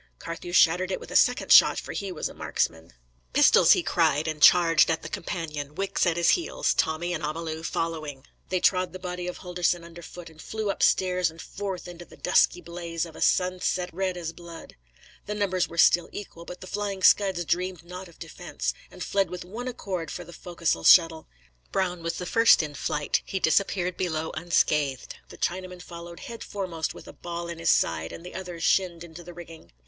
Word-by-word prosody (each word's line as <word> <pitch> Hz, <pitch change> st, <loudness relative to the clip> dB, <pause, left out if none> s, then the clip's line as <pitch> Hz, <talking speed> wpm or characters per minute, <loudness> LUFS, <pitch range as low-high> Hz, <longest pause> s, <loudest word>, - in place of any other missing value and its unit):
Carthew 165 Hz, -, -7 dB
shattered 180 Hz, +1 st, +4 dB
it -, -, -2 dB
with -, -, -11 dB
a -, -, -6 dB
second -, -, +3 dB
shot, -, -, +8 dB
for -, -, -5 dB
he 200 Hz, -2 st, -4 dB
was 165 Hz, -, -3 dB
a -, -, -10 dB
marksman. 80 Hz, -4 st, -3 dB, 0.4 s
"Pistols!" -, -, +6 dB
he -, -, 0 dB
cried, 150 Hz, +3 st, +1 dB
and 155 Hz, -1 st, -4 dB
charged 165 Hz, 0 st, +6 dB
at 160 Hz, -, -1 dB
the -, -, -5 dB
companion, 150 Hz, -4 st, -5 dB
Wicks 195 Hz, -1 st, 0 dB
at 170 Hz, -1 st, +1 dB
his 170 Hz, -, +3 dB
heels, 345 Hz, -, 0 dB
Tommy 165 Hz, +3 st, 0 dB
and 160 Hz, -2 st, -4 dB
Amalu 160 Hz, +1 st, -4 dB
following. 155 Hz, -5 st, -4 dB, 0.2 s
They 185 Hz, -, 0 dB
trod 185 Hz, 0 st, +2 dB
the -, -, -6 dB
body 180 Hz, -1 st, -5 dB
of 180 Hz, -, -5 dB
Holdorsen 180 Hz, -1 st, -1 dB
underfoot, 170 Hz, +1 st, -11 dB
and 160 Hz, -1 st, -14 dB
flew 215 Hz, -2 st, -3 dB
up -, -, -7 dB
stairs 180 Hz, -2 st, +2 dB
and 160 Hz, +1 st, -15 dB
forth 190 Hz, 0 st, -6 dB
into 175 Hz, -1 st, -9 dB
the -, -, -17 dB
dusky 180 Hz, 0 st, +3 dB
blaze 170 Hz, -1 st, -4 dB
of 165 Hz, -2 st, -12 dB
a -, -, -10 dB
sunset 180 Hz, 0 st, +1 dB
red 185 Hz, 0 st, -2 dB
as 165 Hz, -2 st, -5 dB
blood. 170 Hz, -1 st, -12 dB, 0.5 s
The 210 Hz, -, -3 dB
numbers 190 Hz, -3 st, 0 dB
were 170 Hz, -, -11 dB
still 175 Hz, 0 st, +4 dB
equal, 170 Hz, -4 st, -9 dB
but 180 Hz, +1 st, -9 dB
the -, -, -8 dB
Flying 200 Hz, -1 st, -4 dB
Scuds 190 Hz, -4 st, +4 dB
dreamed 180 Hz, +1 st, -2 dB
not 180 Hz, +2 st, -8 dB
of 170 Hz, -, -18 dB
defence, -, -, -5 dB, 0.2 s
and -, -, -8 dB
fled 195 Hz, -3 st, 0 dB
with 180 Hz, 0 st, -7 dB
one 230 Hz, +7 st, -7 dB
accord 190 Hz, -9 st, -4 dB
for 175 Hz, -, -6 dB
the 175 Hz, +1 st, -13 dB
forecastle 170 Hz, -, -2 dB
scuttle. 165 Hz, -, +6 dB, 0.4 s
Brown 180 Hz, -2 st, -1 dB
was 165 Hz, 0 st, -3 dB
first 225 Hz, +1 st, +4 dB
in 150 Hz, -1 st, -6 dB
flight; 145 Hz, +1 st, -1 dB
he 190 Hz, -, -4 dB
disappeared 180 Hz, +1 st, +1 dB
below 160 Hz, -3 st, -2 dB
unscathed; 150 Hz, -4 st, 0 dB
the -, -, -12 dB
Chinaman 180 Hz, 0 st, -3 dB
followed 170 Hz, 0 st, -10 dB
head 230 Hz, -1 st, -8 dB
foremost 180 Hz, -6 st, -4 dB
with -, -, -12 dB
a -, -, -10 dB
ball 170 Hz, 0 st, -6 dB
in 170 Hz, -1 st, -6 dB
his 165 Hz, -, 0 dB
side; 80 Hz, 0 st, +1 dB
and 170 Hz, -, -10 dB
the 180 Hz, -, -9 dB
others 180 Hz, -3 st, -7 dB
shinned 175 Hz, -3 st, +1 dB
into 170 Hz, 0 st, -11 dB
the 175 Hz, 0 st, -11 dB
rigging. 165 Hz, -, -12 dB
175 Hz, 200 wpm, -26 LUFS, 165-185 Hz, 0.5 s, shot